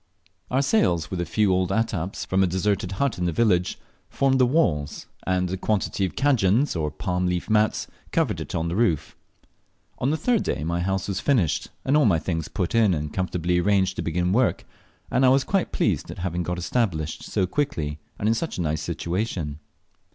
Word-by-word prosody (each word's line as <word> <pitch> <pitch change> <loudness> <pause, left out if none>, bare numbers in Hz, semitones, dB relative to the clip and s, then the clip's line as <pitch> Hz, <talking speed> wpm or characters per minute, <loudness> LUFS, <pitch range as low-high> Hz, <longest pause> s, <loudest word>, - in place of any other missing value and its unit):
Our 130 +2 +2
sails, 85 - +2
with 90 -2 -2
a 85 - -3
few 105 +3 +2
old 90 -1 +1
attaps 100 -4 -1
from 95 +1 +1
a 95 - +4
deserted 95 +1 -1
but 140 -6 0
in 90 - 0
the 85 - +1
village, 90 -2 +2 0.3
formed 135 -1 +2
the 125 - +5
walls, 85 - 0 0.2
and 90 -1 +1
a 95 - -2
quantity 100 0 0
of 95 - -5
"cadjans," 130 -3 +2
or 80 -2 -1
palm 90 +4 -2
leaf 90 +4 -2
mats, 110 0 +2 0.3
covered - - 0
in 80 0 -3
the 85 - -2
roof. 85 -9 +1 0.8
On 130 - +1
the 155 - +1
third 230 +6 +2
day 75 - -2
my 85 +2 -1
house 95 +1 -1
was 100 -1 -2
finished, 115 - +1 0.2
and 135 - +3
all 150 - +5
my 95 -7 +4
things 80 0 -2
put 90 -4 -2
in 110 -6 +4
and 75 -1 -4
comfortably 90 -1 0
arranged 95 0 +2
to - - -1
begin 90 +2 0
work, 120 +3 +1 0.5
and 130 - +2
I 130 - +7
was 135 +1 +4
quite 195 -2 0
pleased - - 0
at - - -7
having 90 -1 -2
got 90 +1 -2
established 85 -4 -1
so 95 - 0
quickly 80 - -2 0.2
and 105 - -1
in 110 - +4
such 160 +8 -3
a - - -1
nice 75 -1 -1
situation. 85 -5 -3
95 Hz, 200 wpm, -24 LUFS, 85-115 Hz, 0.8 s, I